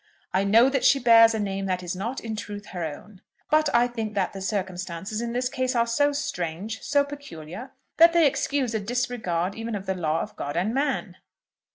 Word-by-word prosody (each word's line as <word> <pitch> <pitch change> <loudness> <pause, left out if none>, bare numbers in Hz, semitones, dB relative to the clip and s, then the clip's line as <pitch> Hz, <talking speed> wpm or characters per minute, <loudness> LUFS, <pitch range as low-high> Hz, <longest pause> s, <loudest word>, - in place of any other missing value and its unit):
I 190 +1 +2
know 225 +5 +5
that 270 -1 0
she 275 - +6
bears 230 -3 +6
a - - -2
name 195 -1 -2
that 185 -1 -1
is 175 +1 -4
not, 230 +8 -3
in 225 -1 -5
truth, 205 -1 -7
her 180 -2 -5
own; 185 +6 -8 0.3
but 310 0 +4
I 240 +1 +4
think 225 -3 -5
that 190 -3 0
the 195 - -7
circumstances 190 +1 -3
in 235 0 -3
this 250 +1 0
case 255 -1 -2
are 235 -1 +3
so 285 +5 +2
strange, 220 - -4
so 285 -1 +2
peculiar, 250 - -9 0.3
that 335 +1 +8
they 335 -1 +4
excuse 275 -3 0
a 220 - 0
disregard 200 -6 -2
even 225 +1 -4
of 195 -1 -5
the 190 - 0
law 165 -3 -1
of - - -7
God 145 +3 -4
and 195 +6 0
man." 275 +1 -1
220 Hz, 210 wpm, -25 LUFS, 190-255 Hz, 0.3 s, that